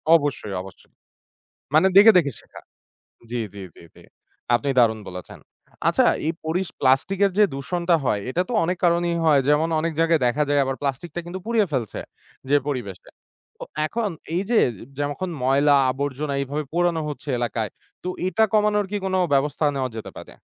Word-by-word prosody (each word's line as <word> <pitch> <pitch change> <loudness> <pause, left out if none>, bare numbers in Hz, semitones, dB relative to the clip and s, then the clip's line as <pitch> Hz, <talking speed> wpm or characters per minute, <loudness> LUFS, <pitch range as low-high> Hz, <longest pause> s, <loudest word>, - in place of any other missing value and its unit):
অবশ্যই, 145 -10 -1
অবশ্যই। 95 -1 -14 0.8
মানে 160 +5 +6
দেখে, 210 +3 +10
দেখে 145 -6 0
শেখা। - - -14 0.7
জি, 120 - -2 0.2
জি, 100 - -8
জি, - - -15
জি। - - -16 0.5
আপনি 140 +3 -1
দারুণ 110 -2 +3
বলেছেন। 90 0 -9 0.5
আচ্ছা, - - +3 0.2
এই 160 - +1
পরিস 175 +3 -1
প্লাস্টিক 135 +9 +2
এর 195 - +1
যে, 210 - +8
দূষণটা 170 +5 0
হয়, 105 -5 +1
এটা 175 - 0
তো 245 - -3
অনেক 180 +2 -1
কারণেই 170 0 +2
হয়। 150 -3 +5
যেমন, 150 +2 +3
অনেক 165 +1 -1
জায়গায় 165 -3 +3
দেখা 145 +5 +1
যায় 145 0 +3
আবার 135 0 -2
প্লাস্টিক 140 +4 -3
টা - - -1
কিন্তু 175 +2 -6
পুড়িয়ে 225 -4 +2
ফেলছে 120 -6 -2 0.5
যে, 145 - +4
পরিবেশে। 110 -10 -5 0.5
তো, - - -8 0.2
এখন 225 +4 -2 0.3
এই 180 - +1
যে, 240 - +4 0.4
যখন 145 +6 -2
ময়লা-আবর্জনা 140 +1 +2
এইভাবে 145 +3 -3
পোড়ানো 175 -2 +1
হচ্ছে 145 0 -8
এলাকায়, 115 -3 -2 0.3
তো 180 - -3 0.2
এটা 185 +5 +2
কমানোর 210 -1 +2
কি 205 - -1
কোনো 190 0 0 0.2
ব্যবস্থা 145 +2 +1
নেওয়া 130 -2 -1
যেতে 110 - -7
পারে? - - -11
150 Hz, 170 wpm, -23 LUFS, 135-175 Hz, 0.8 s, দেখে